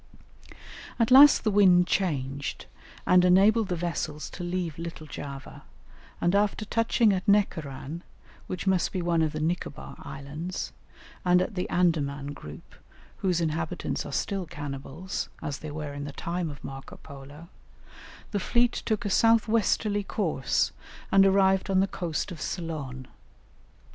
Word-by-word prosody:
At 230 0 +1
last 280 +2 +9
the 215 - +2
wind 185 -3 +6
changed, 140 -7 -2 0.4
and 180 0 +5
enabled 200 +4 +5
the 180 - -1
vessels 165 -3 -3
to 175 - -7
leave 175 -3 -3
Little 165 -2 -6
Java, 140 -2 -8 0.6
and 175 - +1
after 205 +1 +1
touching 230 -1 +2
at 185 +2 -3
Necaran, 160 -6 0 0.5
which 185 +1 -5
must 190 -3 +2
be 185 -2 -2
one 170 -1 +2
of 155 -1 +1
the 155 - -4
Nicobar 160 -2 -3
Islands, 150 +6 -6 0.5
and 180 0 +4
at 185 - -1
the 180 -2 -3
Andaman 145 -5 0
group, 75 - -11 0.4
whose 180 -3 0
inhabitants 160 0 -2
are - - -8
still 195 -4 -2
cannibals, 145 +5 -5
as 145 -4 -4
they 155 - -7
were 150 -1 -5
in 145 0 -5
the 145 - -7
time 170 -1 -3
of 145 -1 -10
Marco 135 0 -8
Polo, 140 +4 -12 0.8
the 205 - 0
fleet 240 +5 +2
took 220 0 -2
a - - 0
south 225 +2 +4
westerly 215 -1 +1
course 165 - 0 0.4
and 195 0 +6
arrived 190 0 +3
on 190 -1 +3
the 190 - +4
coast 175 -1 -3
of 165 -3 -8
Ceylon. 145 -7 -5
175 Hz, 150 wpm, -27 LUFS, 150-195 Hz, 0.8 s, last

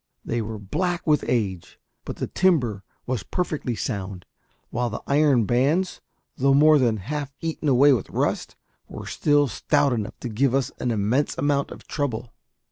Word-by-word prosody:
They 120 0 -1
were 110 0 -5
black 175 - -2
with 150 -3 +3
age; 100 -8 -2 0.3
but - - -5
the - - -3
timber 125 - +1 0.2
was 125 -3 -2
perfectly 155 -9 -2
sound, 100 -5 -4 0.5
while 120 +1 -1
the 110 - -6
iron 140 -5 +3
bands, 145 - +1 0.3
though 135 +1 +3
more 150 +1 +6
than 115 -4 +2
half 145 +7 -4
eaten 160 -2 -2
away 140 +2 +6
with 115 - -2
rust, - - -1 0.3
were - - -8
still 145 -1 +2
stout 135 +2 +1
enough 110 -2 -4
to - - -4
give 125 +4 +1
us 135 -3 0
an 125 - -1
immense 115 +6 0
amount 145 -1 +1
of - - -11
trouble. 125 -5 -3
130 Hz, 165 wpm, -24 LUFS, 110-145 Hz, 0.5 s, more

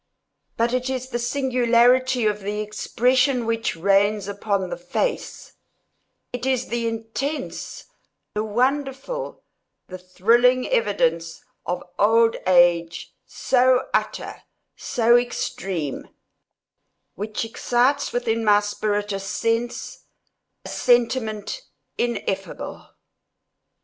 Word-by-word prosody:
But 235 +1 +1
it 255 +1 -1
is 260 -1 -3
the 240 - -2
singularity 250 -1 +2
of 210 -1 +1
the 205 +2 -3
expression 250 +4 +1
which 230 -3 -1
reigns 200 +3 +2
upon 200 -2 -2
the - - -2
face—it 175 - -3 0.9
is 260 -1 0
the 235 0 -1
intense, 225 +7 -4 0.5
the 210 - -1
wonderful, 270 - -2 0.5
the 185 0 -7
thrilling 235 +8 +3
evidence 165 -6 0 0.2
of 180 0 -2 0.2
old 225 +2 +4
age, 170 -2 +3
so 255 0 +2
utter, - - -2 0.3
so 235 0 +2
extreme, 190 - -3 1.1
which 215 +3 -4
excites 250 +5 +1
within 230 -2 -1
my 205 -1 +5
spirit 205 0 -2
a 195 - -2
sense—a 230 +4 -5
sentiment 240 - 0 0.4
ineffable. 195 -6 -3
230 Hz, 95 wpm, -23 LUFS, 205-250 Hz, 1.1 s, my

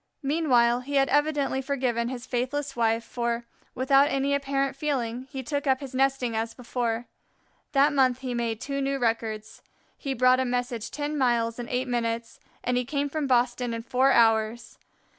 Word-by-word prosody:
Meanwhile 255 -5 +3
he 280 +3 -5
had 270 -1 +3
evidently 290 -2 +1
forgiven 250 -4 -1
his 255 -1 -6
faithless 270 +3 -2
wife, 230 -1 +1
for, 235 0 -2 0.3
without 275 +2 +4
any 275 -1 0
apparent 275 -1 0
feeling, 260 -4 -2
he 265 -2 -6
took 285 +2 -3
up 260 -1 +3
his 275 -3 -8
nesting 265 -3 +1
as 225 +1 -2
before. 240 -1 -2 0.7
That 285 +2 +4
month 260 -2 +2
he 255 -2 -3
made 230 -2 -2
two 275 +2 -3
new 275 0 0
records. 225 -3 -2 0.3
He 275 -1 -4
brought 255 +1 +4
a - - +2
message 245 -2 -2
ten 295 +1 -3
miles 235 -2 +1
in 240 - -5
eight 255 +1 -1
minutes, 230 -1 -2 0.2
and 250 0 0
he 250 - +1
came 285 +2 -2
from 300 0 -2
Boston 245 -1 +1
in 230 - -5
four 260 +3 +3
hours. 225 -1 +2
255 Hz, 175 wpm, -26 LUFS, 235-275 Hz, 0.7 s, without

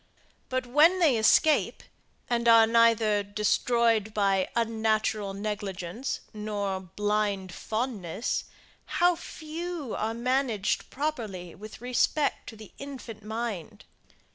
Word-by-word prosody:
But 255 0 -1
when 300 +9 +5
they 320 -8 +4
escape, 265 +8 +3 0.4
and 235 -1 0
are 230 -1 +8
neither 225 -2 +4
destroyed 220 +1 +1
by 195 -2 +2
unnatural 220 -3 0
negligence 200 +1 -4
nor 205 -2 -3
blind 200 0 -1
fondness, 220 -3 -3 0.5
how 350 0 +4
few 325 -3 -6
are 220 +1 -2
managed 245 -4 0
properly 220 - -4
with 215 +3 -11
respect 250 +4 0
to 225 - -10
the 215 -2 -12
infant 260 -6 -8
mind! 220 -2 -5
220 Hz, 105 wpm, -28 LUFS, 205-250 Hz, 0.5 s, are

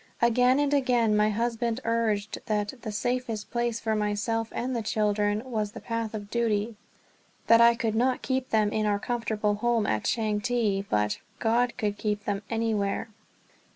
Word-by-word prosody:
Again 250 +2 +4
and 290 0 +1
again 245 -6 +3
my 210 0 +3
husband 230 +1 -1
urged 220 -2 0
that 210 0 -1
"the 215 - -5
safest 240 -1 -2
place" 235 -1 -1
for 220 -1 -1
myself 215 +2 -1
and 255 +1 -3
the 235 - -1
children 210 0 0
"was 215 -5 -3
the - - -7
path 230 -1 -3
of 205 -1 -7
duty"; 225 -1 0 0.7
that 230 0 +6
I 235 0 +7
could 225 -2 -1
not 250 +3 +1
keep 260 0 -1
them 215 -2 +2
in 215 0 0
our 205 -1 +2
comfortable 220 -2 -1
home 230 +1 +1
at 110 - 0
Changte, 215 -2 0
but 105 0 0 0.2
"God 235 +2 +1
could 205 -3 -2
keep 210 -1 -2
them 200 -1 -1
anywhere." 225 -2 -1
225 Hz, 165 wpm, -27 LUFS, 210-235 Hz, 0.7 s, I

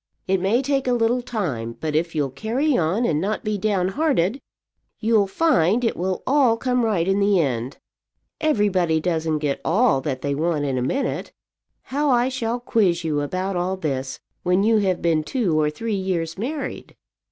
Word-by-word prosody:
It 190 -1 +1
may 220 +8 +2
take 275 -1 0
a 250 - +3
little 240 +1 +1
time; 140 - -4
but 155 -1 -3
if 165 +2 -1
you'll 145 -3 0
carry 250 - 0
on 185 +8 +1
and 155 -7 +1
not 210 +3 -2
be 215 -1 -1
down 190 -3 +1
hearted, 265 - 0 0.6
you'll 220 -3 +2
find 240 - +2
it 230 - 0
will 185 +1 -2
all 260 -5 +3
come 250 0 0
right 195 -7 +1
in 195 +1 +2
the 200 -1 +3
end. 130 -4 -1 0.6
Everybody 195 - +2
doesn't 160 -2 0
get 145 -2 -2
all 205 - +3
that 130 -2 -4
they 140 - 0
want 155 0 0
in 130 -2 -1
a - - -2
minute. 265 - -2 0.5
How 290 +2 -1
I 245 0 +3
shall 240 -2 -2
quiz 195 -8 +1
you 150 -2 0
about 185 +6 -2
all 180 +2 -1
this 135 -6 -3 0.2
when 180 +2 +2
you 220 0 +4
have 190 -3 0
been 160 -2 +2
two 180 - 0
or 150 - +2
three 220 +9 -4
years 180 -4 -2
married!" 265 +7 -5
190 Hz, 185 wpm, -22 LUFS, 160-235 Hz, 0.6 s, you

